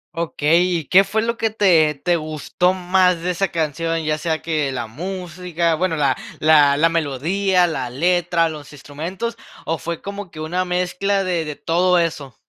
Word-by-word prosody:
Okey. 165 0 +1 0.2
¿Y 155 - -5
qué 190 +5 +6
fue 215 +3 -1
lo 235 0 -2
que 225 -1 0
te 170 -8 +3
te 175 +4 0
gustó 155 +3 -1
más 180 -1 +2
de 180 - 0
esa 195 +3 0
canción? 165 0 -2
¿Ya 155 0 -1
sea 160 0 -2
que 155 -4 -1
la 120 -3 -3
música, 175 - -3
bueno, 165 +1 0
la 140 -3 +1 0.2
la 145 -2 +5
la 165 - +4
melodía, 170 +5 +1
la 135 -7 -3
letra, 170 +4 +1
los 150 -3 -8
instrumentos, 170 - -6 0.3
o 165 0 -2
fue 170 -1 -5
como 200 -1 -6
que 155 - -12
una 175 +4 -2
mezcla 180 +2 0
de 175 -4 -1
de 150 - -5
todo 180 +4 +2
eso? 155 -6 -2
170 Hz, 180 wpm, -20 LUFS, 155-180 Hz, 0.3 s, qué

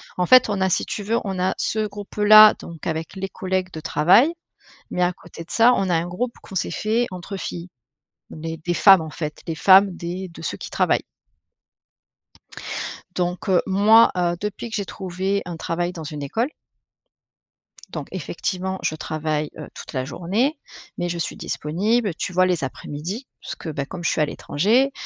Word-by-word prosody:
En 180 - +1
fait, 255 +4 +7
on 200 -2 -1
a 190 - +3
si - - +1
tu 205 - -4
veux, 225 +3 0
on 190 -2 -3
a 185 +1 +1
ce 215 0 -1
groupe-là 210 +1 +6
donc 165 -3 -9
avec 160 +2 -3
les 195 0 -3
collègues 185 -1 -2
de 160 - -5
travail 180 - +4 0.6
mais 180 - -2
à 180 - +2
côté 165 - -11
de 165 - -15
ça, 235 +2 +5
on 195 - 0
a 175 - +2
un 165 +1 0
groupe 235 +8 -3
qu'on 195 - -11
s'est 180 - -1
fait 225 +3 0
entre 185 +2 -7
filles. 175 -1 -6 0.6
On 155 - -10
est 165 0 -4
des 175 - 0
femmes, 195 0 +7
en 160 -1 -6
fait, 150 -1 -5
des 165 - -2
femmes 190 +5 +6
des 180 +2 -5
de 170 - -12
ceux 160 - -4
qui - - -7
travaillent. - - +1 2.1
Donc, 180 +2 -2
heu, 185 -2 +4
moi, 215 +4 +6
heu, 175 -1 +1
depuis 210 +3 -4
que 220 - -4
j'ai 200 - -2
trouvé 190 +1 -2
un 175 -1 -6
travail 175 +2 -2
dans 170 -3 -8
une 150 -1 -6
école. 225 - -1 1.4
Donc - - -6
effectivement 190 0 -3
je 155 - 0
travaille, 155 -1 -2
heu, - - -8
toute - - -10
la 130 -2 -1
journée 215 - -1 0.4
mais 175 0 -2
je 170 - -3
suis 165 - -3
disponible, 200 +7 -1
tu 180 - -4
vois, 185 +1 +4
les 180 -5 0
après-midi 160 - -5
parce - - -6
que, 165 - -7
beh 140 -2 -3
comme 175 +3 -8
je - - +2
suis - - -1
à - - +4
l'étranger, 220 - +1
185 Hz, 195 wpm, -22 LUFS, 165-205 Hz, 2.1 s, fait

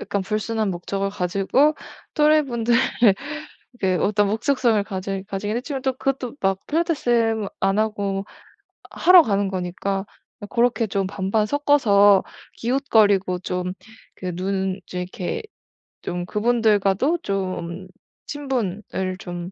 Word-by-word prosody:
약간 200 - -2
불순한 215 +1 -1
목적을 195 +3 -3
가지고 200 - +1 0.4
또래분들 275 -7 +3 1.1
그 185 -1 +2
어떤 210 0 +2
목적성을 225 0 +1
가질 195 0 -4
가지긴 205 +2 -3
했지만 270 +2 -4
또 265 0 0
그것도 260 -1 -2
막 195 0 +2
필라테스 240 - +1
안 195 +2 +1
하고 200 -3 -1 0.6
하러 365 0 +7
가는 200 -7 +1
거니까 190 +2 -3 0.4
고렇게 235 -1 +1
좀 195 -1 -1
반반 200 +2 0
섞어서 210 -7 +4 0.3
기웃거리고 215 -8 +2
좀 180 0 -3 0.4
그 180 -2 -5
눈 190 +1 -2
좀 180 - -5
이렇게 180 - -4 0.6
좀 175 0 -4
그분들과도 220 - +2
좀 185 - -4 0.4
친분을 250 -9 -3 0.4
좀 175 0 -6
205 Hz, 250 characters per minute, -22 LUFS, 190-240 Hz, 1.1 s, 하러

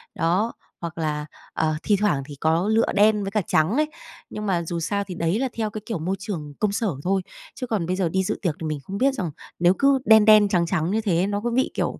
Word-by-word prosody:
Đó, 185 +8 +1 0.3
hoặc 170 0 -6
là, 150 -2 -2 0.3
ờ, 155 -1 0
thi 205 - +3
thoảng 150 -10 +1
thì 145 -1 -9
có 160 +6 +1
lựa 225 +1 +4
đen 210 0 +4
với 195 - -4
cả 210 - +1
trắng 155 +5 +2
ấy. 305 +1 +1 0.4
Nhưng 210 0 -5
mà 175 -4 0
dù 170 +1 -3
sao 200 +5 -1
thì 185 -3 -8
đấy 170 +7 0
là 265 -1 0
theo 220 -2 -2
cái 215 +1 -7
kiểu 215 -8 -3
môi 185 +5 -1
trường 155 -8 -5
công 210 -2 +1
sở 220 +2 -1 0.2
thôi 190 +1 +1 0.3
chứ 255 - -5
còn 205 -7 -1
bây 185 +2 -1
giờ 185 -3 0
đi 190 +2 0
dự - - -2
tiệc 170 -6 -1
thì 160 - -2
mình 150 -2 -3
không 195 +5 -6
biết 270 +3 +3
rằng 180 - -3 0.3
nếu 175 +1 +5
cứ 275 -1 +4
đen 220 -1 +7
đen, 215 -1 +7
trắng 175 -2 +2
trắng 170 0 -1
như 220 +1 +1
thế 185 -6 +1
ấy, 185 +3 +2
nó 205 0 -2
có 240 - -1
bị, 255 +3 +1
kiểu, - - -2
195 Hz, 270 wpm, -23 LUFS, 165-215 Hz, 0.4 s, đen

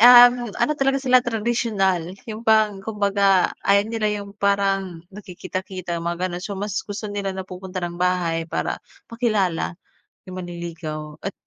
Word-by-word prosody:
um, 245 0 +8
ano 300 - +2
talaga 270 0 +3
sila 255 -1 +6
tradisyonal 210 -6 0
yung 220 -1 -6
parang 215 -2 +4
kumbaga, 200 -3 +2
ayaw 200 +1 +5
nila 225 -1 0
yung 200 -1 -5
parang 195 -4 0
nakikita-kita 185 -2 -5
mga 170 +2 -1
gano'n. 175 0 -5
So, 200 - -4
mas 205 -1 -3
gusto 205 +1 -5
nila 200 -1 -2
na 190 - -4
pupunta 185 0 -7
ng 175 0 -5
bahay 175 -2 +1
para - - -2 0.3
makilala 210 -8 0 0.5
yung 185 0 -6
manliligaw 165 -3 -6
at 195 - -2
195 Hz, 145 wpm, -23 LUFS, 180-215 Hz, 0.5 s, um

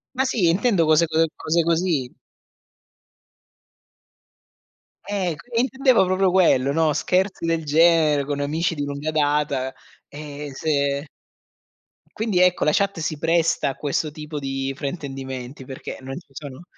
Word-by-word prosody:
Ma 265 - +2
sì, 215 -10 +2
intendo 190 -2 +2
cose 155 +2 +4
co 160 +1 +2
cose 170 +2 +1
così. 165 -6 0 3.0
Eh, 195 -4 -1
c 245 - -16
e - - +3
intendevo 265 -4 +3
proprio 185 +1 +2
quello, 165 -8 +3
no, 160 +1 +2
scherzi 185 +3 0
del 165 -1 0
genere 155 -1 +4
con 145 0 -3
amici 160 +4 -1
di 145 - -3
lunga 145 +2 -3
data, 145 -3 0 0.3
e 145 -1 -8
se 140 0 -1 1.1
Quindi, 215 -4 0
ecco, 180 -1 +3
la 150 - +3
chat 200 -4 +1
si 155 -1 -2
presta 165 -1 +1
a 135 - -5
questo 150 +1 -2
tipo 150 0 -6
di 135 -1 -3
fraintendimenti 135 -3 -6
perché 130 0 -7
non 135 +1 -7
ci 175 - -23
sono, 145 0 -9
155 Hz, 140 wpm, -23 LUFS, 140-175 Hz, 3.0 s, cose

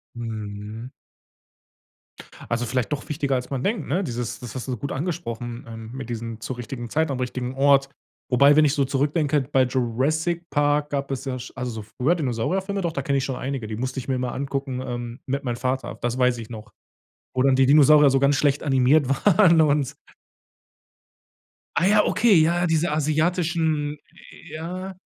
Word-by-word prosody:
Mhm. 110 0 -6 1.6
Also, 120 +1 0
vielleicht 125 +2 -1
doch 145 +1 -3
wichtiger, 140 -3 -1
als 125 0 -3
man 135 -2 -3
denkt, 215 +3 -1
ne? 180 +7 0
Dieses 120 -5 -4
das 125 -1 -9
hast 130 - -5
du 125 -2 -2
gut 140 - -5
angesprochen, 120 -7 -4
ähm, 115 0 -9
mit 130 -2 -7
diesem 115 -1 -5
zur 120 +3 -5
richtigen 120 0 -6
Zeit 160 +2 0
am 130 - -3
richtigen 125 0 -3
Ort. 140 0 +4 0.4
Wobei, 140 +3 +6
wenn 155 0 +6
ich 140 - +2
so 140 -3 +1
zurückdenke, 145 +2 +1
bei 130 -1 +4
„Jurassic 145 +8 -1
Park“ 145 +1 +1
gab 140 -1 -3
es 135 - -4
ja 130 -1 -3
sch 125 - -9
also, 125 -1 -4
so 110 -1 -6
früher, 150 +8 +2
Dinosaurier-Filme. 180 - -1
Doch, 170 -2 -2
da 140 - -2
kenne 140 +1 0
ich 135 - 0
schon 135 -2 -3
einige. 130 -4 -4
Die 110 - -5
musste 130 +3 -3
ich 125 - -8
mir 130 - 0
immer 125 -1 -2
angucken, 135 -1 -3
ähm, 120 0 -5
mit 140 +1 -2
meinem 120 -2 -2
Vater. 130 +1 -2
Das 120 +1 -1
weiß 125 -1 +2
ich 115 -1 -8
noch. 110 -2 -9 0.6
Wo 130 - +2
dann 135 -1 +4
die 135 -1 +4
Dinosaurier 150 0 +7
so 135 0 +2
ganz 140 +1 +3
schlecht 145 0 +1
animiert 135 0 +3 0.2
waren 175 -4 +6
und 145 -3 +2 1.8
Ah 180 - +3
ja, 210 +1 +4
okay, 225 -4 +4
ja, 170 +2 +3
ja, 180 - +2
diese 160 -1 +1
asiatischen 155 -1 0 0.3
äh, - - -14
ja. 180 +4 -6
135 Hz, 190 wpm, -24 LUFS, 125-155 Hz, 1.8 s, Dinosaurier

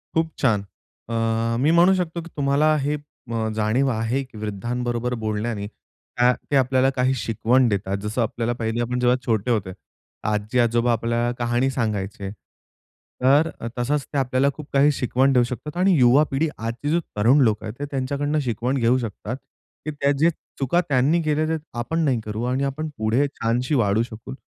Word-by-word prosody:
खूप 165 0 +2
छान. 110 -7 +2 0.5
अ, 115 0 0
मी 145 +5 +3
म्हणू 175 +3 +6
शकतो 175 -2 -2
की 170 - -11
तुम्हाला 145 +2 +3
हे 145 +2 0 0.6
जाणीव 110 +5 +1
आहे 115 +4 -1
की 130 -4 -14
वृद्धांबरोबर 120 +4 -2
बोलण्याने, 105 -1 -2
का 120 +3 -1 0.2
ते - - +3
आपल्याला 130 0 +3
काही 130 -1 +1
शिकवण 120 +1 +2
देतात, 100 -1 -1
जसं 105 +4 -2
आपल्याला 115 +1 -1 0.3
आपण 125 +1 -2
जेव्हा 125 0 +3
छोटे 115 +1 0
होते, 100 -5 0 0.6
आजी-आजोबा 115 +3 +1
आपल्याला 115 +1 0
कहाणी 120 +2 +1
सांगायचे. 105 -6 -3 0.9
तर 140 +5 +4
अ, 115 - -4
तसंच 140 +4 0
ते - - 0
आपल्याला 130 +1 +2
खूप 150 0 -10
काही 140 +2 +5
शिकवण 135 0 +1
देऊ 125 -2 +5
शकतात. 130 +7 -6
आणि 185 -1 +4
युवा 125 +4 +6
पिढी 150 +4 +1
आजची 115 +6 -4
जी 165 +3 +3 0.2
तरुण 120 +8 +5
लोकं 110 -3 +1
आहेत, 110 - -5
ते 145 - -2
त्यांच्याकडनं 140 +3 -1
शिकवण 125 0 -1
घेऊ 120 0 +3
शकतात. 115 0 -5 0.5
की 155 - -2
त्या 140 -1 +1
जे 165 +3 +5 0.3
चुका 140 +6 +2
त्यांनी 145 +5 +3
केल्या, 155 0 +1
ते 160 0 0 0.2
आपण 160 +7 -2
नाही 130 -5 +2
करू 110 +2 -4
आणि 130 +2 0
आपण 140 +3 -2
पुढे 110 +6 +1
छानशी 125 +1 -1
वाढू 110 -3 +2
शकू. 120 +2 -9
125 Hz, 170 wpm, -23 LUFS, 115-140 Hz, 0.9 s, म्हणू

